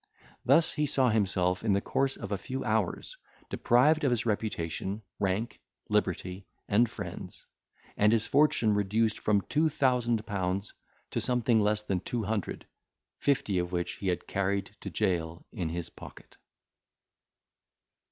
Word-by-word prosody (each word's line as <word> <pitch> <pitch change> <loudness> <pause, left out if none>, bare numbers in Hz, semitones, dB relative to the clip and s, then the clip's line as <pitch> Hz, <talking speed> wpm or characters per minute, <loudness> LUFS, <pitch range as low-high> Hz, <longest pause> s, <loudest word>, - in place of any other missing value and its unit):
Thus, 165 0 +4
he 150 -1 0
saw 135 -3 +3
himself, 95 -4 +1
in 110 -3 +2
the 100 - +3
course 135 +5 -1
of 100 - -7
a 100 - 0
few 130 +6 -4
hours, 110 -4 -1 0.3
deprived 150 +7 +3
of 140 - +4
his 120 -2 0
reputation, 105 -2 -2 0.2
rank, 100 +4 -1 0.3
liberty, 90 +1 -1 0.2
and 115 +3 +3
friends; - - -7 0.5
and 105 +1 +4
his 115 -1 +2
fortune 140 -7 +3
reduced 105 +2 +1
from 105 -1 +2
two 155 +7 +1
thousand 120 -6 +1
pounds 100 -1 -2 0.4
to - - -1
something 120 -2 +2
less 105 0 +2
than 95 -3 -1
two 115 +4 -3
hundred, 105 -1 -3 0.5
fifty 110 -9 +1
of 90 0 -2
which 85 -1 -2
he 100 - -4
had 90 -1 -1
carried 100 0 -1
to - - -6
jail 85 -2 -1
in 85 -3 -3
his 85 0 -4
pocket. - - -13
105 Hz, 145 wpm, -29 LUFS, 95-120 Hz, 0.5 s, Thus